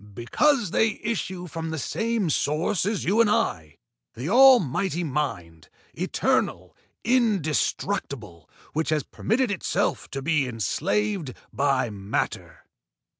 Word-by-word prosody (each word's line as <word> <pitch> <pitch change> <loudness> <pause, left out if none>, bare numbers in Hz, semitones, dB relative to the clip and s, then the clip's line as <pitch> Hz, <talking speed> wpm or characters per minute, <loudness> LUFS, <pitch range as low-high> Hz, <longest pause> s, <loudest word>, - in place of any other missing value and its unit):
"Because 230 - +1
they 220 0 +1
issue 190 -5 -3
from 165 -1 -5
the 160 - -3
same 225 - -1
source 165 +8 0
as 205 -2 -1
you 210 +6 +3
and 225 - +3
I, 80 - -1 0.4
the 125 +8 -4
almighty 200 - +5
mind, 90 - -4 0.2
eternal, - - -1 0.3
indestructible, 175 - -1 0.2
which 160 +1 -1
has 155 -3 +1
permitted 240 +2 -1
itself 190 - -1
to 135 -1 -5
be 150 -3 +1
enslaved 145 - -1 0.2
by 135 -4 +1
matter. 100 0 -4
165 Hz, 115 wpm, -25 LUFS, 130-210 Hz, 0.4 s, almighty